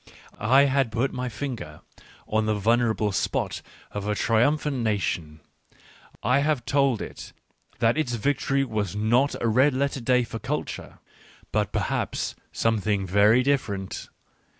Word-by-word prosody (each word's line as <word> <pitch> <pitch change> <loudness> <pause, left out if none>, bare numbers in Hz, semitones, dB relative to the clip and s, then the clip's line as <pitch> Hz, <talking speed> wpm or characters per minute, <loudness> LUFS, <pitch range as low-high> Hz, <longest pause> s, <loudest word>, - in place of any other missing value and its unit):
I 130 +6 +5
had 135 -3 +2
put 125 +5 0
my 125 0 -3
finger 110 - -6 0.5
on 110 0 0
the 110 - +2
vulnerable 110 0 +2
spot 95 - -1 0.3
of 105 0 -4
a 105 - 0
triumphant 135 +7 +2
nation 90 -9 -2 0.4
— - - -25
I 125 +5 +3
had 145 -4 0
told 135 -3 +2
it - - -9 0.4
that 115 +6 +2
its 125 -6 0
victory 135 +3 +1
was 105 -6 -2
not 120 +7 +2
a 115 - 0
red 130 +5 +4
letter 140 0 -1
day 125 +1 +3
for 115 -1 -6
culture, 150 +6 -4 0.5
but, - - 0
perhaps, - - -2 0.2
something 105 -3 0
very 105 +6 +4
different. 105 -9 -2
120 Hz, 140 wpm, -25 LUFS, 105-135 Hz, 0.5 s, I